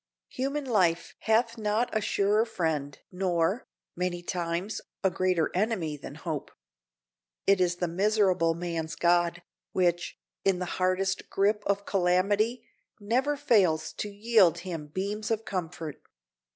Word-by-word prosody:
Human 275 Hz, +3 st, -2 dB
life 180 Hz, -9 st, +1 dB
hath 230 Hz, +1 st, +1 dB
not 215 Hz, +3 st, 0 dB
a 215 Hz, -, +2 dB
surer 205 Hz, +2 st, +2 dB
friend 160 Hz, -, -2 dB
nor, 180 Hz, +3 st, 0 dB, 0.3 s
many 175 Hz, 0 st, -2 dB
times, 175 Hz, +3 st, -2 dB, 0.2 s
a 190 Hz, -, +3 dB
greater 180 Hz, -2 st, +1 dB
enemy 185 Hz, -6 st, 0 dB
than 140 Hz, 0 st, -9 dB
hope. 155 Hz, -2 st, -4 dB, 1.0 s
It 195 Hz, -1 st, +4 dB
is 175 Hz, -1 st, +2 dB
the 175 Hz, 0 st, -1 dB
miserable 185 Hz, -2 st, +2 dB
man's 165 Hz, -2 st, -3 dB
god, 175 Hz, 0 st, +2 dB, 0.3 s
which, 175 Hz, -1 st, +1 dB, 0.3 s
in 195 Hz, -2 st, +3 dB
the 180 Hz, -, -2 dB, 0.2 s
hardest 185 Hz, +1 st, 0 dB
grip 205 Hz, +2 st, +2 dB
of 200 Hz, 0 st, 0 dB
calamity, 200 Hz, +6 st, +1 dB, 0.3 s
never 255 Hz, +8 st, +1 dB
fails 200 Hz, -, +2 dB
to 210 Hz, -, -3 dB
yield 205 Hz, -4 st, +4 dB
him 165 Hz, -5 st, -5 dB
beams 200 Hz, +6 st, -3 dB
of 225 Hz, 0 st, -1 dB
comfort. 165 Hz, -4 st, -5 dB
185 Hz, 130 wpm, -28 LUFS, 170-210 Hz, 1.0 s, It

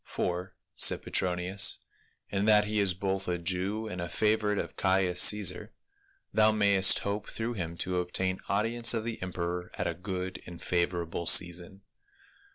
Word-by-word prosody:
"For," 90 Hz, +2 st, -4 dB, 0.2 s
said -, -, +4 dB
Petronius, 90 Hz, +2 st, 0 dB, 0.5 s
"in 100 Hz, 0 st, -1 dB
that 105 Hz, -1 st, +5 dB
he 105 Hz, 0 st, -1 dB
is 95 Hz, -3 st, +2 dB
both 95 Hz, 0 st, -3 dB
a 90 Hz, -1 st, -1 dB
Jew 95 Hz, +5 st, -2 dB
and 90 Hz, -4 st, -6 dB
a 85 Hz, -, -5 dB
favorite 105 Hz, -1 st, 0 dB
of -, -, -5 dB
Caius 95 Hz, -2 st, +1 dB
Caisar, 105 Hz, +1 st, -2 dB, 0.6 s
thou 110 Hz, 0 st, +4 dB
mayest 100 Hz, -3 st, +4 dB
hope 100 Hz, +1 st, -3 dB
through 115 Hz, +2 st, -4 dB
him 85 Hz, -5 st, -5 dB
to 90 Hz, +1 st, -1 dB
obtain 95 Hz, +1 st, -1 dB
audience 115 Hz, +4 st, +1 dB
of 110 Hz, -, -2 dB
the 115 Hz, 0 st, -6 dB
emperor 90 Hz, -1 st, -4 dB
at -, -, -3 dB
a -, -, -1 dB
good 95 Hz, 0 st, -6 dB
and 85 Hz, -1 st, -10 dB
favorable 85 Hz, -1 st, -2 dB
season. 90 Hz, +3 st, +3 dB
95 Hz, 160 wpm, -29 LUFS, 90-105 Hz, 0.6 s, that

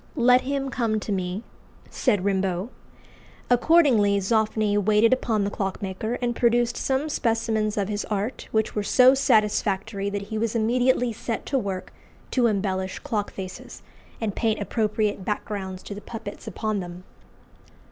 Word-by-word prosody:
"Let 250 Hz, 0 st, +5 dB
him 275 Hz, 0 st, -2 dB
come 225 Hz, -4 st, 0 dB
to 210 Hz, -, -5 dB
me," 185 Hz, +2 st, -2 dB, 0.5 s
said 200 Hz, -3 st, +1 dB
Rimbault. 190 Hz, 0 st, 0 dB, 0.8 s
Accordingly 245 Hz, -7 st, +4 dB
Zoffany 215 Hz, +1 st, +1 dB
waited 210 Hz, +3 st, +4 dB
upon 225 Hz, -5 st, 0 dB
the 200 Hz, -, -1 dB
clockmaker, 195 Hz, +3 st, -3 dB
and 240 Hz, -1 st, 0 dB
produced 240 Hz, 0 st, +2 dB
some 270 Hz, +3 st, 0 dB
specimens 225 Hz, -5 st, 0 dB
of 200 Hz, -2 st, 0 dB
his 205 Hz, -1 st, -2 dB
art, 210 Hz, +4 st, -3 dB
which 220 Hz, -1 st, 0 dB
were 210 Hz, -, -1 dB
so 250 Hz, +5 st, +6 dB
satisfactory 210 Hz, -4 st, +1 dB
that 200 Hz, 0 st, -3 dB
he 215 Hz, +2 st, -4 dB
was 230 Hz, +1 st, -1 dB
immediately 245 Hz, +1 st, +2 dB
set 235 Hz, 0 st, -4 dB
to 275 Hz, -, 0 dB
work 190 Hz, -4 st, -5 dB, 0.4 s
to 245 Hz, -2 st, +3 dB
embellish 190 Hz, -3 st, -1 dB
clock 220 Hz, -8 st, -3 dB
faces, 185 Hz, -1 st, -8 dB, 0.4 s
and 220 Hz, -3 st, -2 dB
paint 220 Hz, -2 st, 0 dB
appropriate 210 Hz, -1 st, -1 dB
backgrounds 195 Hz, -2 st, -4 dB
to -, -, -7 dB
the 205 Hz, -, -8 dB
puppets 225 Hz, -1 st, -8 dB
upon 215 Hz, 0 st, -2 dB
them. 175 Hz, 0 st, -7 dB
215 Hz, 145 wpm, -25 LUFS, 200-235 Hz, 0.8 s, so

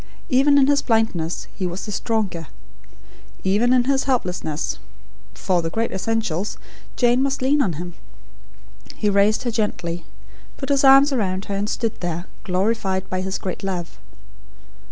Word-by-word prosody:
Even 280 Hz, +2 st, +5 dB
in 275 Hz, -, +6 dB
his 285 Hz, +1 st, +3 dB
blindness, 220 Hz, -8 st, 0 dB
he 185 Hz, -, -2 dB
was 175 Hz, +2 st, -5 dB
the 210 Hz, -, -5 dB
stronger. 195 Hz, -7 st, -2 dB, 1.0 s
Even 210 Hz, +6 st, +2 dB
in 255 Hz, -1 st, +5 dB
his 270 Hz, +1 st, +1 dB
helplessness, 180 Hz, -, -1 dB, 0.6 s
for 180 Hz, -3 st, +1 dB
the 165 Hz, -, -2 dB
great 225 Hz, +7 st, -1 dB
essentials, 205 Hz, -2 st, -2 dB, 0.4 s
Jane 245 Hz, +1 st, +3 dB
must 275 Hz, -1 st, 0 dB
lean 285 Hz, +3 st, +3 dB
on 190 Hz, -9 st, +1 dB
him. 175 Hz, +3 st, -6 dB, 1.0 s
He 210 Hz, -, +1 dB
raised 200 Hz, +3 st, +3 dB
her 240 Hz, -, -1 dB
gently, 180 Hz, -6 st, -2 dB, 0.5 s
put 270 Hz, -, -5 dB
his 280 Hz, -1 st, +3 dB
arms 275 Hz, +1 st, +7 dB
about 195 Hz, -7 st, -1 dB
her, 200 Hz, -, -3 dB
and 205 Hz, +2 st, -1 dB
stood 230 Hz, -1 st, -2 dB
there, 175 Hz, 0 st, -3 dB, 0.2 s
glorified 190 Hz, 0 st, -1 dB
by 185 Hz, 0 st, -1 dB
his 190 Hz, +1 st, -2 dB
great 185 Hz, -, -5 dB
love. 180 Hz, -3 st, -4 dB
205 Hz, 155 wpm, -22 LUFS, 180-250 Hz, 1.0 s, arms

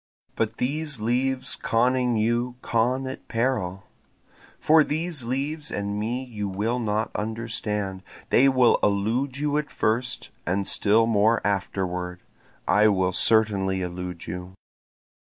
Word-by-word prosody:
But 110 Hz, 0 st, -1 dB
these 150 Hz, 0 st, -1 dB
leaves 130 Hz, +3 st, 0 dB
conning 125 Hz, +1 st, +1 dB
you 120 Hz, +3 st, 0 dB
con 125 Hz, +3 st, +1 dB
at 130 Hz, 0 st, -7 dB
peril, 115 Hz, -6 st, -1 dB, 0.8 s
For 155 Hz, 0 st, +5 dB
these 155 Hz, -3 st, -3 dB
leaves 145 Hz, +5 st, -2 dB
and 100 Hz, 0 st, -3 dB
me 120 Hz, +5 st, -2 dB
you 105 Hz, -5 st, -5 dB
will 110 Hz, +6 st, -1 dB
not 110 Hz, -1 st, -1 dB
understand, 105 Hz, -3 st, -3 dB, 0.3 s
They 135 Hz, +2 st, +6 dB
will 130 Hz, -3 st, +4 dB
elude 115 Hz, +7 st, 0 dB
you 145 Hz, 0 st, 0 dB
at 150 Hz, -1 st, -2 dB
first 120 Hz, +3 st, -1 dB
and 95 Hz, +2 st, -1 dB
still 110 Hz, +2 st, +3 dB
more 115 Hz, +1 st, +3 dB
afterward, 90 Hz, -2 st, -2 dB, 0.4 s
I 105 Hz, +1 st, +5 dB
will 95 Hz, -3 st, +2 dB
certainly 95 Hz, -3 st, +2 dB
elude 90 Hz, -1 st, -5 dB
you. 90 Hz, +2 st, -7 dB
115 Hz, 125 wpm, -25 LUFS, 100-130 Hz, 0.8 s, They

